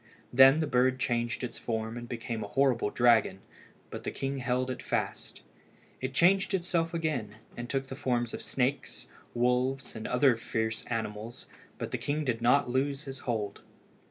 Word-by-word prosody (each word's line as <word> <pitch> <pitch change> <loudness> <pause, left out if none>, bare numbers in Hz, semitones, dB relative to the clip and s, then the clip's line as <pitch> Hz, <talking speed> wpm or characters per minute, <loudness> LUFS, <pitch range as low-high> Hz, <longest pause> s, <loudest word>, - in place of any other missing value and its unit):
Then 135 +4 +7
the - - +1
bird 130 -1 +2
changed 120 -1 -1
its 120 -2 -5
form 110 -1 -3
and 120 0 -7
became 115 -1 -4
a - - -5
horrible 130 -6 +2
dragon, 115 -5 +3 0.5
but - - -6
the - - -2
king 135 0 -3
held 125 +1 0
it 125 - -5
fast. - - -3 0.6
It 130 +1 -3
changed 190 +4 +4
itself 170 -2 -1
again, 135 -11 -2 0.2
and 120 0 -6
took 135 -1 -1
the 135 - -7
forms 120 -4 -1
of - - -5
snakes, 135 +2 -2 0.3
wolves, 125 +2 +1
and 110 - -5
other 125 0 +4
fierce 110 -1 -2
animals, 110 0 -4 0.3
but - - -5
the - - -2
king 150 +1 -1
did 120 -3 -1
not 130 +4 +4
lose 135 +3 0
his 135 -1 -7
hold. 105 -4 -2
125 Hz, 170 wpm, -30 LUFS, 115-135 Hz, 0.6 s, Then